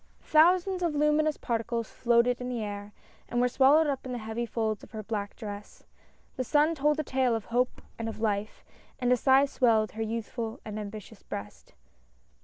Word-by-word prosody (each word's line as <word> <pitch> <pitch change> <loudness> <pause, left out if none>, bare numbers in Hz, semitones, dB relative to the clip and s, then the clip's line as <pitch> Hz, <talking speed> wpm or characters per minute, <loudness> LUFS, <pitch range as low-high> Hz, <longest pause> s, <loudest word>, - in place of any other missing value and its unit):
Thousands 360 +4 +4
of 335 -4 0
luminous 300 +1 +2
particles 230 -1 -2
floated 240 +1 +2
in 250 - -4
the 240 -3 -2
air 205 0 -6 0.4
and 240 - 0
were 250 - +4
swallowed 275 +5 +5
up 280 -3 -2
in 260 - -6
the 245 - -3
heavy 225 +1 -4
folds 220 -3 -2
of - - -14
her 215 -1 -5
black 205 -2 -4
dress. 205 -2 -8 0.5
The 255 - 0
sun 300 +5 +3
told 300 0 +1
a - - 0
tale 260 -3 +1
of 225 - -4
hope 245 +2 -1 0.2
and 225 0 -2
of 220 - -8
life, 210 -1 -2 0.3
and 250 -1 0
a - - +6
sigh 265 +3 +5
swelled 225 -6 +2
her 220 - -6
youthful 225 0 -4
and 215 -1 -5
ambitious 210 0 -8
breast. 105 +1 -9
235 Hz, 190 wpm, -28 LUFS, 220-270 Hz, 0.5 s, a